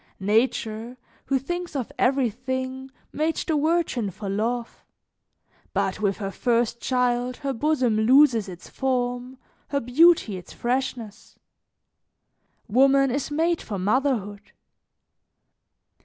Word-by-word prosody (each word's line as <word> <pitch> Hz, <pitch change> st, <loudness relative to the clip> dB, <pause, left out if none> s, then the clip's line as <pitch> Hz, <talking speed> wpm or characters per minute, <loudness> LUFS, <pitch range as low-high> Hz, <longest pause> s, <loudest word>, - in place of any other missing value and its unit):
"Nature, 220 Hz, +3 st, 0 dB, 0.3 s
who 275 Hz, -, +1 dB
thinks 350 Hz, +5 st, -5 dB
of 255 Hz, -5 st, -3 dB
everything, 260 Hz, +1 st, -1 dB, 0.2 s
made 315 Hz, +2 st, 0 dB
the 320 Hz, -, -1 dB
virgin 300 Hz, -8 st, 0 dB
for 200 Hz, +2 st, -8 dB
love; 230 Hz, +4 st, -3 dB, 0.9 s
but -, -, -1 dB
with 200 Hz, -2 st, +1 dB
her 195 Hz, -2 st, -4 dB
first 235 Hz, +1 st, 0 dB
child 250 Hz, -1 st, 0 dB
her 275 Hz, -1 st, -3 dB
bosom 260 Hz, -4 st, +1 dB
loses 235 Hz, -2 st, +4 dB
its 180 Hz, -1 st, -10 dB
form, 250 Hz, -1 st, -2 dB, 0.3 s
her 280 Hz, -, -1 dB
beauty 260 Hz, -, +4 dB
its 180 Hz, -, -11 dB
freshness. 240 Hz, -3 st, -4 dB, 1.3 s
Woman 270 Hz, +3 st, +4 dB
is 280 Hz, +3 st, -2 dB
made 330 Hz, +3 st, 0 dB
for 205 Hz, -, -5 dB
motherhood. 205 Hz, -1 st, -1 dB
250 Hz, 110 wpm, -24 LUFS, 220-275 Hz, 1.3 s, loses